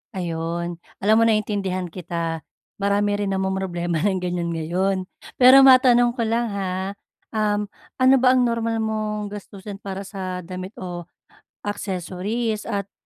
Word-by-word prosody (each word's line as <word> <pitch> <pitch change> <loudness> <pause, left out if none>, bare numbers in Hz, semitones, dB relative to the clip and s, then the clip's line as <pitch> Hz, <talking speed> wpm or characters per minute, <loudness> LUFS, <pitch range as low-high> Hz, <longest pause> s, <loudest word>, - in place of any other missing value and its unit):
Ayon. 170 0 -3 0.2
Alam 215 +2 +5
mo 230 - +5
naintindihan 200 -4 0
kita. 170 -2 -3 0.4
Marami 205 +1 +1
rin 200 -1 -1
namomroblema 190 -3 -1
ng 190 -3 +1
ganyan 175 -1 -2
ngayon. 180 +4 0 0.4
Pero 265 +2 +8
matanong 245 -2 +6
ko 235 - -2
lang, 230 +2 +1
ha, 190 0 -3 0.4
um, 210 -1 +1 0.3
ano 260 +1 +6
ba 255 -1 +6
ang 250 - +4
normal 230 -1 0
mong 215 -1 -2
gastusin 200 0 -9
para 195 0 -5
sa 185 -2 -5
damit 185 +2 -6
o 175 -2 -5 0.6
accessories? 205 +3 -3
At 200 -3 -3
200 Hz, 135 wpm, -23 LUFS, 180-215 Hz, 0.6 s, Pero